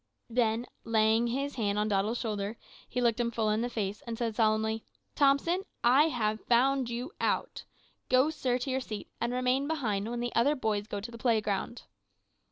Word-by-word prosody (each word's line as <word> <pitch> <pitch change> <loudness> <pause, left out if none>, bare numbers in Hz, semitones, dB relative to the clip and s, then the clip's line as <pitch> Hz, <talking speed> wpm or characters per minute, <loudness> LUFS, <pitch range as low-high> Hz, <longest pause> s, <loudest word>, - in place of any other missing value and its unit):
Then 230 0 +1 0.2
laying 225 +1 +3
his 275 +4 -2
hand 205 -4 -1
on 210 0 +1
Doddle's 210 +3 +1
shoulder, 210 -1 -3 0.3
he 250 - -2
looked 235 -1 +2
him 235 -1 +1
full 220 -2 0
in 215 +1 +1
the 245 - -1
face, 205 -3 -3
and 230 -1 -4
said 230 -2 -2
solemnly, 220 0 +1 0.3
`Thompson, 290 +6 +3 0.2
I 260 +5 +6
have 220 -8 -1
found 255 +1 +3
you 245 +6 -4
out. - - -1 0.4
Go, 260 +4 +4
sir, 255 -5 0
to 255 +2 -3
your 265 +1 0
seat, 215 -5 -6
and 235 +1 0
remain 255 +2 +1
behind 225 -10 -1
when 240 0 -3
the 240 0 -3
other 275 +6 +3
boys 215 -5 -1
go 205 -2 -4
to 235 +4 -7
the 230 - -10
playground.' 225 -1 0
235 Hz, 185 wpm, -30 LUFS, 215-255 Hz, 0.4 s, I